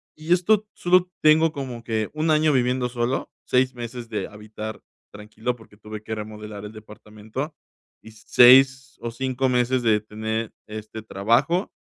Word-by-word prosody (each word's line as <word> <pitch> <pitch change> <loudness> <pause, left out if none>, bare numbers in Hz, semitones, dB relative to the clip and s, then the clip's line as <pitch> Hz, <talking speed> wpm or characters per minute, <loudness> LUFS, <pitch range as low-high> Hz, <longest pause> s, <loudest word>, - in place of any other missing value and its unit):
Y 155 +2 -7
esto 210 +4 +2
solo 180 0 +3
tengo 155 +1 +5
como 130 -6 -6
que 110 -2 -2
1 155 +1 -1
año 155 -1 +3
viviendo 125 -1 +1
solo, 120 +1 -2
6 130 0 +2
meses 120 0 -7
de 105 -3 -3
habitar 110 +1 -8 0.3
tranquilo 110 +4 -4
porque 110 -3 -18
tuve 105 0 -9
que 110 - -5
remodelar 105 -1 -8
el 105 - -8
departamento 110 +6 -8 0.5
y 110 - -12
6 130 +4 +5
o 120 - -3
5 130 +2 -1
meses 125 0 +1
de 110 -2 +3
tener 110 +1 -4
este 110 +1 -7
trabajo 120 - +1
120 Hz, 150 wpm, -24 LUFS, 110-135 Hz, 0.5 s, tengo